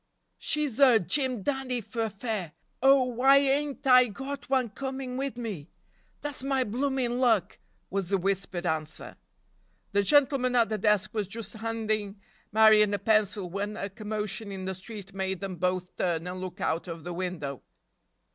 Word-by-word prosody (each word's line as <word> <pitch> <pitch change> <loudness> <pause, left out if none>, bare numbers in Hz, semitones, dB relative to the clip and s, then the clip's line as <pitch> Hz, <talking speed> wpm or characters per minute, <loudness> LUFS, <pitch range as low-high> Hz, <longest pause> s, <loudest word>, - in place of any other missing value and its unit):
"She's 290 -5 0
er 260 -5 +7
Jim 240 - 0
Dandy 265 -2 -1
fer 225 0 -3
fair! 200 -6 -4 0.3
Oh, 270 0 +6
why 255 +3 +4
ain't 280 +1 +1
I 255 -1 +7
got 270 +6 -7
one 260 -3 +2
coming 265 +2 -5
wid 270 -1 -3
me? 200 -10 -5 0.5
Dat's 290 -3 -4
my 270 -1 +1
bloomin' 250 +1 -1
luck!" 230 -7 +2 0.3
was 195 -2 -2
the 195 - +2
whispered 190 -1 -2
answer. 155 -2 -3 0.8
The 200 0 +3
gentleman 265 +1 +3
at 235 -3 +4
the 215 -1 -2
desk 210 +2 +2
was 210 -3 -1
just 215 0 -6
handing 220 -2 -2 0.3
Marion 215 -1 +6
a - - -1
pencil 205 -2 +1
when 200 +4 -4
a 200 - -3
commotion 210 0 -4
in 190 -1 -5
the 190 - -2
street 195 +1 -9
made 190 -1 -2
them 195 -2 -5
both 180 +1 -1
turn 170 -2 0
and 180 +1 -5
look 185 +1 -6
out 165 -1 -1
of 165 -2 -7
the 175 +1 -5
window. 170 -7 -4
215 Hz, 165 wpm, -28 LUFS, 190-255 Hz, 0.8 s, er